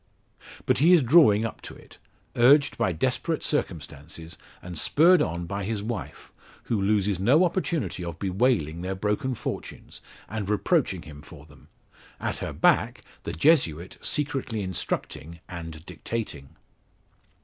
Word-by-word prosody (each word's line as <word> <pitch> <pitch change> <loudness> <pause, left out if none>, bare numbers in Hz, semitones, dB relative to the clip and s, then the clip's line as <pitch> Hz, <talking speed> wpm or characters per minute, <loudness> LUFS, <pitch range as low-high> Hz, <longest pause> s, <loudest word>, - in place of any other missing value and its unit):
But - - +2
he 165 +6 +6
is 170 -6 +6
drawing 115 -6 +5
up 115 - -6
to - - -10
it, - - -17 0.4
urged 135 +4 +5
by 95 - 0
desperate 130 - -1
circumstances, 80 - -4 0.2
and 90 -1 -9
spurred 165 - +4
on 85 +2 -2
by 100 +3 -4
his 105 0 -3
wife, 110 -3 -6 0.3
who 110 -4 -1
loses 100 -2 +1
no 135 - +4
opportunity 160 - -2
of 85 -2 -6
bewailing 95 - 0
their 95 +1 -3
broken 105 +6 -1
fortunes, - - -7 0.3
and 105 -2 -4
reproaching 105 - +1
him 75 -2 -11
for 75 -1 -13
them; 75 -3 -19 0.5
at - - -3
her - - -4
back - - +2 0.2
the - - -4
Jesuit 85 - +2
secretly 135 -7 -2
instructing, 85 -3 -4
and 80 -2 -8
dictating. 90 -5 -6
100 Hz, 140 wpm, -26 LUFS, 85-130 Hz, 0.5 s, he